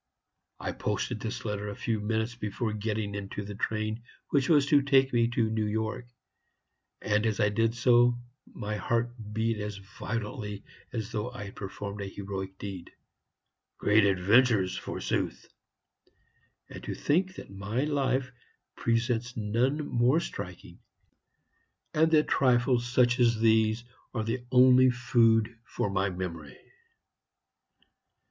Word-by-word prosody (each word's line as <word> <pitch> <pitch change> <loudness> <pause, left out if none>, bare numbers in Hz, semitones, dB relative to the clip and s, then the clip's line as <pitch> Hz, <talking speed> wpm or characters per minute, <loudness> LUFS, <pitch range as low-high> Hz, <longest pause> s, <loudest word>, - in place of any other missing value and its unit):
I - - -3
posted - - -2
this - - -5
letter 105 0 -3
a 100 - -6
few 110 +1 -1
minutes 110 +2 -1
before 110 0 -3
getting 105 -1 -2
into 100 0 -5
the 105 - -6
train 110 +2 -2 0.3
which 140 -2 +2
was 145 -4 +5
to 145 0 +5
take 135 -1 +3
me 115 -1 +3
to 115 -2 0
New 110 -1 0
York; 110 +3 -2 1.0
and, 105 0 +2
as 110 0 -1
I 105 -2 +4
did 115 +2 +1
so, 120 0 +4 0.3
my 105 0 -4
heart 115 +4 0 0.2
beat 110 0 0
as 105 -1 -4
violently 105 +1 -5 0.3
as 115 -1 -4
though 110 +1 -2
I 125 -4 -8
had 100 - -9
performed 100 +1 -6
a 100 - -4
heroic 95 -1 -6
deed. 95 -4 -7 0.9
Great 105 +1 +4
adventures, 100 0 +3
forsooth! 95 - -3 1.2
And - - -10
to - - -4
think 185 +5 +1
that - - -10
my 100 +6 -2
life 135 -3 0 0.4
presents 120 +1 0
none 125 +8 0
more 125 +6 +3
striking, 170 - -7 1.1
and 160 +1 +4
that 155 -1 +4
trifles 120 -1 +2
such 125 0 +3
as 115 -2 +3
these 110 0 +3 0.3
are 110 - 0
the 120 +3 -2
only 130 0 +7
food 115 -2 +2
for 100 - -3
my 100 0 +1
memory! 85 -6 -6
110 Hz, 135 wpm, -29 LUFS, 105-125 Hz, 1.2 s, only